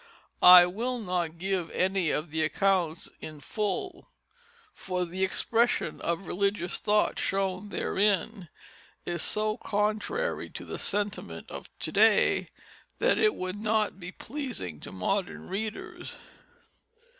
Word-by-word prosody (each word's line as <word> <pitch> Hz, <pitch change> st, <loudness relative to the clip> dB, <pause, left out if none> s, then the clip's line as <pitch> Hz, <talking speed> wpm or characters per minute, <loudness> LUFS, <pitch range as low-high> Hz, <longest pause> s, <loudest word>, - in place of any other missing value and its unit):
I 180 Hz, 0 st, +11 dB
will 235 Hz, +8 st, -2 dB
not 180 Hz, -6 st, -2 dB
give 185 Hz, -1 st, -1 dB
any 190 Hz, -3 st, +1 dB
of 150 Hz, +2 st, -2 dB
the 160 Hz, 0 st, 0 dB
accounts 175 Hz, -1 st, 0 dB
in 155 Hz, -1 st, -8 dB
full, 215 Hz, -, -3 dB, 0.6 s
for 180 Hz, -1 st, -3 dB
the 185 Hz, +2 st, -3 dB
expression 230 Hz, +5 st, +1 dB
of 170 Hz, +3 st, -2 dB
religious 200 Hz, -1 st, -1 dB
thought 210 Hz, 0 st, +2 dB
shown 195 Hz, +1 st, -1 dB
therein 200 Hz, -2 st, 0 dB, 0.6 s
is 175 Hz, -2 st, -2 dB
so 215 Hz, 0 st, 0 dB
contrary 215 Hz, -, -1 dB
to -, -, -8 dB
the -, -, -6 dB
sentiment 205 Hz, +1 st, -2 dB
of -, -, -8 dB
to -, -, -3 dB
day -, -, +4 dB, 0.5 s
that -, -, +2 dB
it 430 Hz, -1 st, +3 dB
would 185 Hz, +2 st, -4 dB
not 215 Hz, -2 st, 0 dB
be 180 Hz, 0 st, -7 dB
pleasing 245 Hz, -, -6 dB
to -, -, -9 dB
modern 185 Hz, -, -2 dB
readers. 215 Hz, +3 st, -5 dB
195 Hz, 125 wpm, -28 LUFS, 180-215 Hz, 0.6 s, I